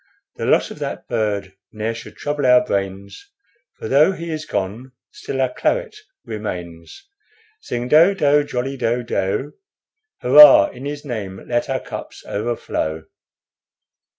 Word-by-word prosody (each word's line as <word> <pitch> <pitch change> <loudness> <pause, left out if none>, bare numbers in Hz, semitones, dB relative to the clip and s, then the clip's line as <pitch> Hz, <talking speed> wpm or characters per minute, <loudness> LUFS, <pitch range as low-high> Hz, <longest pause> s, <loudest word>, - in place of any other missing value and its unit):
The - - -3
loss - - +2
of - - -10
that - - -5
bird 105 -4 -2 0.2
ne'er 110 +1 -3
should 115 +1 -11
trouble 145 -2 -1
our 125 0 +5
brains, 100 - -4 0.5
For - - -6
though 150 +9 +4
he 170 -2 -6
is 155 0 -5
gone, 115 +6 -4 0.2
still 135 - -6
our 130 -1 0
claret - - -1 0.3
remains. 90 - -7 0.5
Sing 120 - -4
do 165 +8 +5
do 145 -4 +3
jolly 135 0 -4
do 120 0 -1
do! 110 +6 -2 0.7
Hurrah! 145 +2 +8
in 125 +2 -10
his 145 +1 -6
name 100 -7 -6
let 120 +1 -1
our 135 -1 0
cups - - -9
overflow." 100 -8 -3
125 Hz, 140 wpm, -20 LUFS, 105-145 Hz, 0.7 s, Hurrah